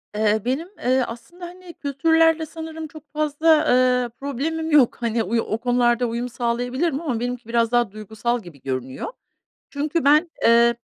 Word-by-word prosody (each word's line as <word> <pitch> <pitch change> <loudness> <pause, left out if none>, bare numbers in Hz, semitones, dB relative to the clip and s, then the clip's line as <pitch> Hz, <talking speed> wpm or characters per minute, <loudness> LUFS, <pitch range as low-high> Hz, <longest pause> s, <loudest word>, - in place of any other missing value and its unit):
Eee, 215 0 +2
benim, 275 +8 -1
eee, 255 +1 +2
aslında, 345 +10 -9
hani, 355 0 -11
kültürlerle 320 +3 +2
sanırım 320 0 -7
çok 300 0 -15
fazla, 305 +1 -1 0.2
eee, 250 -1 +3
problemim 310 +4 -3
yok. 280 -6 +4
Hani, 230 -1 0
oy 230 +4 0
o 215 - -2
konularda 245 0 +2
uyum 235 +2 -3
sağlayabilirim 245 +6 -1
ama 260 -9 -2
benimki 245 -1 -4
biraz 230 0 +1
daha 240 -4 +2
duygusal 220 +3 -3
gibi 155 -6 -14
görünüyor. 130 -1 -4 0.6
Çünkü 300 +2 -1
ben, 305 +4 +4
eee, 235 +1 +5
250 Hz, 155 wpm, -22 LUFS, 235-310 Hz, 0.6 s, eee